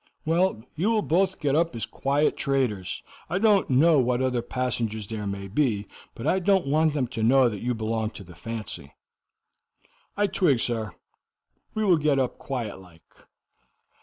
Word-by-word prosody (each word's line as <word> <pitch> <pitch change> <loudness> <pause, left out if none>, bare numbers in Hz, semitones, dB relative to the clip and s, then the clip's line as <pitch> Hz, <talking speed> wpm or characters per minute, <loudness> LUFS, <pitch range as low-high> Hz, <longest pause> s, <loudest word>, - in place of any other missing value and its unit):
"Well, 165 -7 +1
you 180 +8 +1
will 220 -2 +2
both 190 +3 +1
get 140 -2 0
up 165 -4 +1
as 115 -2 -2
quiet 140 +5 0
traders. 120 -10 -1 0.3
I 175 - 0
don't 205 -1 +3
know 150 +4 +5
what 125 -1 +1
other 130 -2 0
passengers 115 -3 -2
there 105 0 -5
may 100 0 -4
be, 105 -2 0 0.3
but 115 - -7
I 190 - +2
don't 190 0 +2
want 155 +2 +2
them 135 -4 +1
to 115 - -4
know 130 +3 +5
that 105 -3 -6
you 125 0 -1
belong 110 0 -1
to 100 - -9
the 90 -1 -13
fancy." 105 -6 -7 1.2
"I 205 - +3
twig, 180 - +2
sir. 115 -3 -1 0.8
We 215 0 0
will 180 -4 +5
get 150 -2 +2
up 130 -2 -1
quiet 120 -8 -4
like." 85 -3 -18
130 Hz, 170 wpm, -26 LUFS, 110-160 Hz, 1.2 s, know